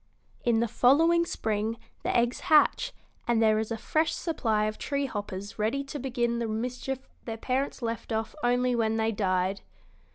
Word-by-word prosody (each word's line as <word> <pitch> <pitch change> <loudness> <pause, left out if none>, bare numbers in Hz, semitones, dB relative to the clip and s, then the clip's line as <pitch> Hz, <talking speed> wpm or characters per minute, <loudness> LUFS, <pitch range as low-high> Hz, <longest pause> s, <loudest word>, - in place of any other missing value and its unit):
In 230 -2 +3
the 235 - +2
following 325 +9 +4
spring 220 -2 -1 0.2
the - - +1
eggs 240 +1 +1
hatch, 320 +10 +5 0.4
and 235 -1 +3
there 215 -1 +4
is 220 - -2
a 230 - -2
fresh 310 +8 0
supply 225 -10 0
of 215 0 -3
tree 280 -1 -1
hoppers 205 -4 -5
ready 230 +7 0
to 280 +1 -6
begin 240 -2 -1
the 230 - -1
mischief 250 +4 -3 0.2
their 225 -1 -4
parents 260 +2 -2
left 230 0 -3
off 220 0 -1
only 245 +1 +2
when 225 -1 +1
they 225 0 +1
died." 190 -2 0
235 Hz, 170 wpm, -28 LUFS, 220-265 Hz, 0.4 s, hatch